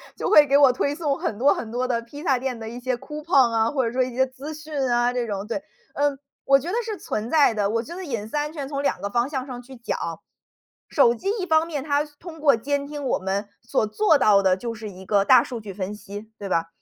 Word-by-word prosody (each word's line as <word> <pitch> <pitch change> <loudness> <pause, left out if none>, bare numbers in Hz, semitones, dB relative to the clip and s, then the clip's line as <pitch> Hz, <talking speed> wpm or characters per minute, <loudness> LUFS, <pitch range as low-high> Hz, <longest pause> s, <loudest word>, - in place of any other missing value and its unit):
就 - - -2
会 300 -1 +8
给 280 0 +4
我 275 -3 +6
推 285 +3 0
送 290 -3 -1
很 205 - -3
多 280 +3 +5
很 220 - -6
多 250 +1 -1
的 235 -2 0
披 285 +6 -11
萨 270 -6 +2
店 250 -2 -3
的 220 - -7
一 240 +2 -7
些 255 0 -1
coupon 295 -4 +1
啊， 225 +2 +2
或 265 -4 0
者 230 - -1
说 255 0 +2
一 250 -1 -4
些 260 0 +3
资 275 +4 -8
讯 310 0 -10 0.2
啊 240 +1 +2
这 245 -1 -1
种， 200 -1 -4
对。 255 +5 -3 0.3
嗯， 285 -1 +1 0.3
我 275 0 +6
觉 310 - -8
得 - - -3
是 430 -3 -4
存 215 +3 -4
在 295 -7 +4
的， 205 -2 0
我 230 +1 0
觉 340 +9 -9
得 375 - -6
隐 230 -9 -4
私 260 - -7
安 295 +1 -1
全 285 -4 -5
从 280 -1 -3
2 - - 0
个 200 - -2
方 240 +5 0
向 265 -3 -3
上 245 -1 -7
去 260 +2 -13
讲。 235 0 -3 0.9
手 240 -5 +4
机 385 - -7
一 - - -1
方 320 -1 +3
面 295 -5 -4
它 290 -1 +1
通 315 +2 -12
过 285 -4 +5
监 280 +4 -2
听 290 0 -6
我 250 - +1
们， 195 +2 -2
所 235 -2 0
做 325 - +3
到 200 -6 +4
的 185 -1 +3
就 230 +2 -4
是 215 -1 -7
一 190 -1 -11
个 200 -1 +3
大 255 -3 +7
数 240 -3 -6
据 205 -2 -8
分 195 +2 -4
析， 205 +2 -10
对 200 -1 -6
吧？ 165 -2 +1
255 Hz, 300 characters per minute, -24 LUFS, 220-290 Hz, 0.9 s, 会